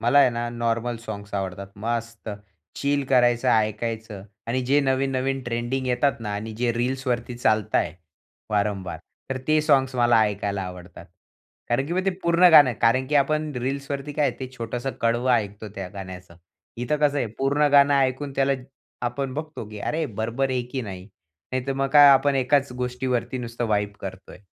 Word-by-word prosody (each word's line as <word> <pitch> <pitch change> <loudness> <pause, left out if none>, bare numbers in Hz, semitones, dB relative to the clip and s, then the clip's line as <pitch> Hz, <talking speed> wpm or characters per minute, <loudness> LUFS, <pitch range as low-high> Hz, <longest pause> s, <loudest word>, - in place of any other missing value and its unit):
मला 120 +5 +4
आहे 135 -3 +6
ना 120 0 -3
नॉर्मल 120 0 -1
साँग्स 100 0 -7
आवडतात. 95 0 -3
मस्त! 115 +1 -4 0.5
चिल 140 0 0
करायचं, 120 -1 +3
ऐकायचं 110 -2 -1 0.2
आणि 120 +3 0
जे 140 +3 +3
नवीन-नवीन 135 0 0
ट्रेंडिंग 120 +2 -2
येतात 125 +1 +1
ना 105 -2 -4
आणि 110 +2 -5
जे 120 0 +1
रील्सवरती 125 0 -2
चालत 110 -3 +1
आहे, - - +2 0.6
वारंवार, 100 -3 -1 0.3
तर 135 - -1
ते 155 0 +4
साँग्स 135 -3 +3
मला 120 -2 +4
ऐकायला 100 -1 -2
आवडतात. 90 -1 -9 0.6
कारण 135 +4 +1
की 170 - -4
मग 185 +1 0
ते 195 - +2
पूर्ण 170 +1 +5
गाणं 150 -4 +9
आहे 120 - -7
कारण 130 +3 +3
की 150 - -2
आपण 150 +2 +2
रील्सवरती 140 +3 -3
काय 145 -1 +2
आहे 125 - -6
ते 130 - -4
छोटंसं 120 +3 -3
कडवं 120 +2 +1
ऐकतो 105 -2 -1
त्या 95 -2 -5
गाण्याचं. 95 -3 -9 0.4
इथं 125 +5 -1
कसं 145 -1 +2
आहे 125 - 0
पूर्ण 145 +2 +2
गाणं 140 0 +6
ऐकून 135 +1 0
त्याला 135 0 +3 0.5
आपण 130 +2 -3
बघतो 155 -4 -5
की 105 0 -9
"अरे 160 +8 -1 0.2
बरोबर 120 +5 -1
आहे 125 -1 0
की 130 -2 -2
नाही." 95 -4 -7 0.5
नाहीतर 130 +1 -1
मग 135 0 -1
काय 145 -1 +9
आपण 140 +1 +3
एकाच 135 +1 +2
गोष्टीवरती 125 0 -2
नुसतं 120 -1 -4
वाइब 105 -1 0
करतोय. 95 -1 -8
125 Hz, 175 wpm, -24 LUFS, 110-135 Hz, 0.6 s, गाणं